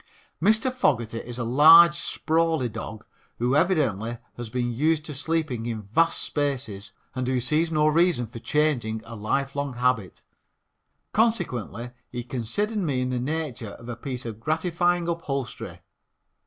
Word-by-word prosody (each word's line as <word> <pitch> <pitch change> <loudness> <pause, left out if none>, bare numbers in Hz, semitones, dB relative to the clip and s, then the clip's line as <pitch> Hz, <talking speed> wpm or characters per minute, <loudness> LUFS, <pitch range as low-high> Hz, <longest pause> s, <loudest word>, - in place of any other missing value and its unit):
Mr. 220 +7 +3
Fogerty 120 - +1
is 120 +1 -7
a 125 - -2
large, 160 +8 +8
sprawly 165 -4 +1
dog, 110 0 -7 0.3
who 125 +3 +1
evidently 130 - +1 0.2
has 120 -2 -6
been 120 0 -1
used 155 +4 +1
to 150 - -5
sleeping 145 -5 -2
in 110 -2 -4
vast 165 +12 +1
spaces 125 -9 -3 0.2
and 130 -1 -2
who 130 -1 +1
sees 155 +7 +1
no 150 -1 +2
reason 165 -4 +3
for 115 +1 -9
changing 120 -6 0
a 115 0 -8
lifelong 135 +5 -2
habit. 120 -7 -1 0.9
Consequently 125 - 0 0.2
he 120 -1 -5
considered 135 - -2
me 145 -9 0
in 130 0 -1
the 125 - -1
nature 130 -6 -3
of 115 - -12
a 120 - -3
piece 125 +1 -6
of 110 -2 -6
gratifying 170 +5 0
upholstery. 145 -6 -4
130 Hz, 145 wpm, -25 LUFS, 120-160 Hz, 0.9 s, large